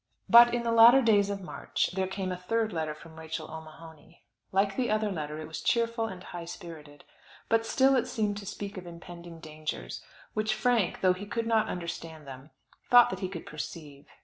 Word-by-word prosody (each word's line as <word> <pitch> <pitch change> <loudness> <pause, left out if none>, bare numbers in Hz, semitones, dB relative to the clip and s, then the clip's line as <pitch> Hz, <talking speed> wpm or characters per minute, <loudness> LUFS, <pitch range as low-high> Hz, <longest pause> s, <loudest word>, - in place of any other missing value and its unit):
But 235 +1 +9
in 240 - -1
the 230 - 0
latter 235 +4 +8
days 205 -3 +4
of 200 -1 -3
March - - -2
there 190 0 -1
came 190 0 -3
a - - -2
third 220 +4 -1
letter 155 -2 -2
from 160 +1 -13
Rachel 160 0 -6
O'Mahony. 160 +1 -12 0.3
Like 195 +1 +1
the 255 -2 0
other 215 -1 +1
letter 150 -4 -4
it 155 0 -7
was 160 - -6
cheerful, 230 -1 +1
and 185 -3 -8
high 175 -1 -7
spirited; 155 -4 -10 0.5
but 225 0 +2
still 270 +2 +4
it 250 - +1
seemed 210 -2 -1
to 200 -1 -8
speak 200 0 -6
of 180 -1 -8
impending 170 0 -10
dangers, 155 - -6 0.3
which 215 0 0
Frank, 235 -4 +1
though 185 -1 +4
he 195 +3 -8
could 230 +2 -2
not 220 -1 +2
understand 165 -3 -6
them, 135 +1 -10 0.4
thought 245 -1 +7
that 190 - -4
he 185 -2 -3
could 175 -4 -7
perceive. 150 -2 -8
185 Hz, 200 wpm, -29 LUFS, 160-220 Hz, 0.5 s, But